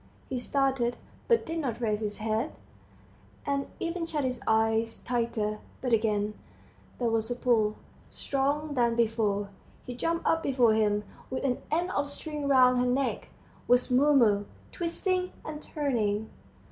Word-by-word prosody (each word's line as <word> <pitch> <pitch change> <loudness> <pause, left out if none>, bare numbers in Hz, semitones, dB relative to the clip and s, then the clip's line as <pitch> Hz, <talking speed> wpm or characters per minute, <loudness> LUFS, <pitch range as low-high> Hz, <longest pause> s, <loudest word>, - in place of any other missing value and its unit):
He 255 - -2
started, 265 -2 0 0.3
but 465 -1 +3
did 330 +1 -3
not 250 -7 -2
raise 215 -3 0
his 210 -1 -3
head, 220 +6 -1 0.9
and 280 -1 -1
even 335 0 -2
shut 305 -3 -1
his 255 -2 -2
eyes 225 +1 +2
tighter. 230 -3 -1 0.2
But 250 -2 -1
again 210 -2 +1 0.6
there 235 -2 0
was 225 0 0
a 245 - -1
pull, 225 -4 +2 0.3
stronger 285 +2 -1
than 235 -3 +2
before; 215 -3 +1 0.4
he 250 - -5
jumped 330 +7 -1
up 325 0 +3
before 250 -7 +3
him, 210 -1 +2 0.3
with 260 - -3
an 255 -3 0
end 345 +4 0
of 285 0 -1
string 295 0 -5
round 255 -2 +5
her 250 - +2
neck, 255 +1 0 0.4
was 245 +1 +3
Mumu, 250 -7 +4 0.3
twisting 365 +1 -1
and 305 -1 -6
turning. 220 -9 -1
250 Hz, 145 wpm, -29 LUFS, 220-285 Hz, 0.9 s, round